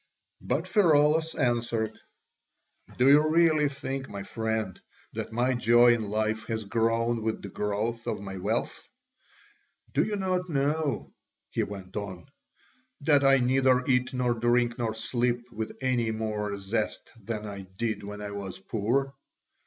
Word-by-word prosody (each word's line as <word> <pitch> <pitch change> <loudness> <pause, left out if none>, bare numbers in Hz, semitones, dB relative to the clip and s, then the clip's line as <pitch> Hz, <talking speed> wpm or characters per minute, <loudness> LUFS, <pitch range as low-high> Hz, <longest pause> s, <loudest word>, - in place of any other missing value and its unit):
But - - -1
Pheraulas 160 -4 +3
answered: 120 -2 0 1.0
"Do 125 - +4
you 150 +2 +6
really 155 -2 +4
think, 135 -1 -5
my 100 -1 -6
friend, 110 -3 -3 0.3
that - - -4
my 120 +3 +1
joy 120 0 +5
in 115 - -1
life 110 +1 -1
has 110 -1 -2
grown 115 +2 +1
with 110 0 -2
the 100 - -6
growth 105 +4 -2
of - - -1
my 95 -1 -6
wealth? 90 - -2 1.1
Do - - +3
you 210 - -2
not 185 -2 -1
know," 145 -1 -1 0.4
he - - 0
went 95 -2 -6
on, 95 -3 -5 0.8
"that 145 -1 +4
I 135 0 +6
neither 130 0 +3
eat 125 -1 +2
nor 125 -2 +1
drink 120 +1 +1
nor 115 -2 -1
sleep 120 +1 -1
with 110 -1 -5
any 125 -3 +1
more 105 -2 -2
zest 105 +3 -3
than 110 0 -4
I 100 -2 -7
did 110 -2 -1
when 105 0 -7
I 100 - -5
was 100 -2 -6
poor? 120 +7 -1
120 Hz, 145 wpm, -28 LUFS, 110-135 Hz, 1.1 s, you